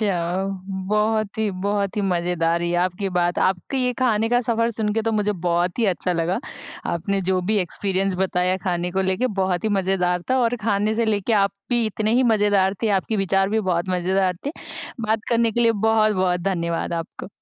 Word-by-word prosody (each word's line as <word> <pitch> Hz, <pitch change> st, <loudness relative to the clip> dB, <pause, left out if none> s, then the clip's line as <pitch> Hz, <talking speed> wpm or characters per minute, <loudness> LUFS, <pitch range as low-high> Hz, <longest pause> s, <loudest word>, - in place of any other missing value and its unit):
जाओ, 185 Hz, -1 st, 0 dB, 0.4 s
बहुत 215 Hz, 0 st, 0 dB
ही 220 Hz, -1 st, +1 dB
बहुत 200 Hz, 0 st, -1 dB
ही -, -, +1 dB
मज़ेदार 175 Hz, -2 st, +1 dB
रही 175 Hz, 0 st, -1 dB
आपकी 185 Hz, +2 st, -2 dB
बात। 175 Hz, 0 st, +1 dB
आपकी 190 Hz, +8 st, 0 dB
ये 250 Hz, -, +1 dB
खाने 225 Hz, -3 st, +2 dB
का 245 Hz, 0 st, +3 dB
सफ़र 230 Hz, -1 st, 0 dB
सुन 215 Hz, -2 st, -1 dB
के 225 Hz, -, +1 dB
तो 225 Hz, 0 st, 0 dB
मुझे 210 Hz, -1 st, +1 dB
बहुत 175 Hz, +3 st, +1 dB
ही 230 Hz, -, +2 dB
अच्छा 180 Hz, +1 st, -2 dB
लगा, 170 Hz, +3 st, 0 dB, 0.5 s
आपने 195 Hz, +4 st, -1 dB
जो 185 Hz, -1 st, +2 dB
भी 215 Hz, -, +2 dB
एक्सपीरियंस 195 Hz, +1 st, -1 dB
बताया 185 Hz, -1 st, +1 dB
खाने 175 Hz, -1 st, -1 dB
को 190 Hz, +2 st, 0 dB
लेके 190 Hz, +7 st, 0 dB
बहुत 185 Hz, -1 st, 0 dB
ही -, -, +2 dB
मज़ेदार 180 Hz, -2 st, 0 dB
था 260 Hz, -, +3 dB
और 245 Hz, 0 st, +1 dB
खाने 210 Hz, 0 st, +1 dB
से 230 Hz, +1 st, +1 dB
लेके 210 Hz, +1 st, 0 dB
आप 200 Hz, -, +1 dB, 0.2 s
भी 240 Hz, -1 st, +2 dB
इतने 215 Hz, +1 st, -1 dB
ही 255 Hz, -, +4 dB
मज़ेदार 205 Hz, -2 st, +2 dB
थे, 225 Hz, -, +2 dB
आपके 205 Hz, +2 st, 0 dB
विचार 195 Hz, 0 st, +1 dB
भी 220 Hz, +1 st, +1 dB
बहुत 180 Hz, -3 st, -1 dB
मज़ेदार 185 Hz, 0 st, +1 dB
थे। 285 Hz, -, -1 dB, 0.5 s
बात 220 Hz, 0 st, 0 dB
करने 235 Hz, -1 st, +2 dB
के 240 Hz, -, 0 dB
लिए 230 Hz, -1 st, +4 dB
बहुत-बहुत 210 Hz, -4 st, +2 dB
धन्यवाद 170 Hz, -3 st, -2 dB
आपका। 165 Hz, +1 st, -5 dB
195 Hz, 195 wpm, -22 LUFS, 180-220 Hz, 0.5 s, ही